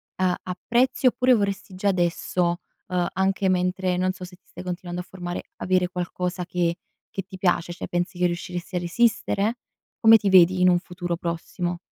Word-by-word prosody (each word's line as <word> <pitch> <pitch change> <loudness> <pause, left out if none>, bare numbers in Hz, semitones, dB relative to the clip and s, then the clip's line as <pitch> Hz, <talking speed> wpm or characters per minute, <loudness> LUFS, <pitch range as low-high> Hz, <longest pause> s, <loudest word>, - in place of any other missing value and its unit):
a 185 -1 +1
apprezzi 240 +9 0
oppure 250 +1 +4
vorresti 200 -3 -1
già 190 +2 -1
adesso, 175 -1 0 0.3
uhm, 180 -1 0
anche 190 +1 +1
mentre 180 0 +1
non 185 +1 +1
so 185 -1 -8
se 180 0 -13
ti 185 - -34
stai - - -10
continuando 180 0 -4
a - - -11
formare, 175 -2 -5
avere 185 -1 +1
qualcosa 180 0 -3
che 175 -1 0 0.3
che 195 - -4
ti 190 +1 -11
piace? 175 -2 +1
Cioè 175 - -6
pensi 175 +1 -2
che 180 - +2
riusciresti 175 +1 -3
a - - +2
resistere? 215 +3 +1 0.4
Come 225 0 +8
ti 205 -2 0
vedi 185 0 +6
in 180 - +6
un 175 -1 +4
futuro 175 -1 -4
prossimo? 175 +1 -3
180 Hz, 180 wpm, -24 LUFS, 175-190 Hz, 0.4 s, Come